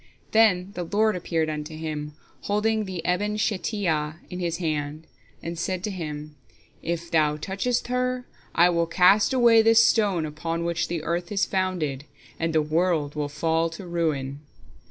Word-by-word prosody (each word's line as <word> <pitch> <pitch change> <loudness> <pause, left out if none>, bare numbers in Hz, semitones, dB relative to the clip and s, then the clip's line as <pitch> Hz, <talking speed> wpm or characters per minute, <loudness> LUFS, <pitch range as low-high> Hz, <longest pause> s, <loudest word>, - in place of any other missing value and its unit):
Then 200 -4 +4
the 180 - -4
Lord 210 +4 +1
appeared 165 -2 -1
unto 155 0 -5
him, 150 -2 -5 0.3
holding 215 +1 +1
the 185 -4 -6
Eben 205 +4 0
Shetiyah 185 -8 -1 0.2
in 180 - -5
His 170 -2 -1
hand, 155 -2 -3 0.4
and 170 0 -5
said 185 +1 -2
to 210 - -2
him: 150 -4 -6 0.5
"If 170 0 -4
thou 150 -2 +3
touchest 200 +9 -1
her, 250 0 -1 0.3
I 175 +1 +6
will 170 -1 +1
cast 190 +6 +5
away 235 -3 +6
this 225 0 +6
stone 200 -9 +2
upon 165 +2 -3
which 170 0 -1
the 170 -2 -3
earth 170 +2 -2
is 200 -1 +2
founded, 175 -8 -1 0.3
and 165 0 0
the 160 -1 +2
world 155 -1 +1
will 150 -1 -2
fall 165 +2 0
to 195 - -8
ruin." 150 -6 -2
170 Hz, 160 wpm, -25 LUFS, 155-200 Hz, 0.5 s, I